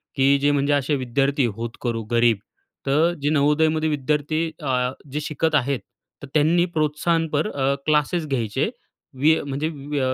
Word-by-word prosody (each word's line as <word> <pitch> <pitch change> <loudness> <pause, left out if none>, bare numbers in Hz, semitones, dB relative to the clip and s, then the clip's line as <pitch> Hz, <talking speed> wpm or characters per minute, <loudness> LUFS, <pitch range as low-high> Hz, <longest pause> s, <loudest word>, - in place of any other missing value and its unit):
की 140 0 +4
जे 145 +1 +3
म्हणजे 145 0 +1
असे 145 +1 +1
विद्यार्थी 135 +1 +1
होतकरू, 115 0 -4
गरीब, 115 -2 +4 0.5
तर 155 +5 +3
जे 145 - +1
नवोदयमध्ये 155 +2 +2
विद्यार्थी 150 +2 0 0.2
अ, 125 -3 0 0.2
जे 150 - -2
शिकत 155 +1 -1
आहेत, 140 -2 +1 0.4
तर - - -6
त्यांनी 160 +3 +3
प्रोत्साहनपर 155 +2 0
अ, 135 0 +1
क्लासेस 155 +2 +1
घ्यायचे, 130 - -1 0.5
वि 155 +3 +5
अ, - - -4
म्हणजे 145 +3 -2
व 145 -1 -7
व 140 - +1
145 Hz, 155 wpm, -23 LUFS, 135-155 Hz, 0.5 s, वि